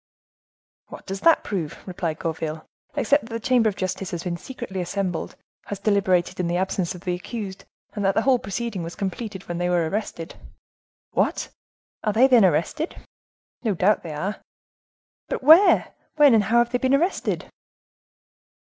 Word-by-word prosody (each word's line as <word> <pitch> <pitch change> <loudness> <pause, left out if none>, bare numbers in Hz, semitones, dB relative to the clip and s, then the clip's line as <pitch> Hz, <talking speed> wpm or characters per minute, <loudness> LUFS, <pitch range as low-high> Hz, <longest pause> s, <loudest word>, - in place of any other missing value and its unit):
"What - - -11
does 195 0 -5
that 330 - +5
prove?" 175 -7 -3
replied 175 -4 -3
Gourville, 160 -2 -4 0.3
"except 285 -3 +2
that 230 - -9
the 230 - -2
chamber 235 -1 +3
of 200 - -6
justice 185 0 -3
has 170 -2 -4
been 175 -2 -2
secretly 195 -2 -6
assembled, 180 -1 -3 0.3
has 205 - -5
deliberated 190 -4 +1
in 180 - 0
the 175 +1 0
absence 185 -1 -1
of 175 - -10
the 180 -1 -2
accused, 195 +1 -6 0.3
and 205 - -3
that 195 0 +2
the 220 - +2
whole 260 -2 +4
proceeding 210 -1 -4
was 165 +1 -6
complete 200 0 -5
when 175 0 -4
they 175 0 0
were 175 -2 +2
arrested." 190 -3 -4 0.8
"What! - - 0 0.5
are 210 - +1
they, 235 +5 +6
then, 250 -5 +6
arrested?" 185 - +1 0.7
"No 215 -5 0
doubt 195 +5 +3
they 165 -3 -7
are." 190 +8 -3 0.9
"But - - -4
where, 325 +8 +6 0.2
when, 295 -4 +6
and 215 -3 +4
how 230 +4 +2
have 240 0 +3
they 245 - 0
been 260 +2 +3
arrested?" 345 +7 0
195 Hz, 170 wpm, -24 LUFS, 175-235 Hz, 0.9 s, they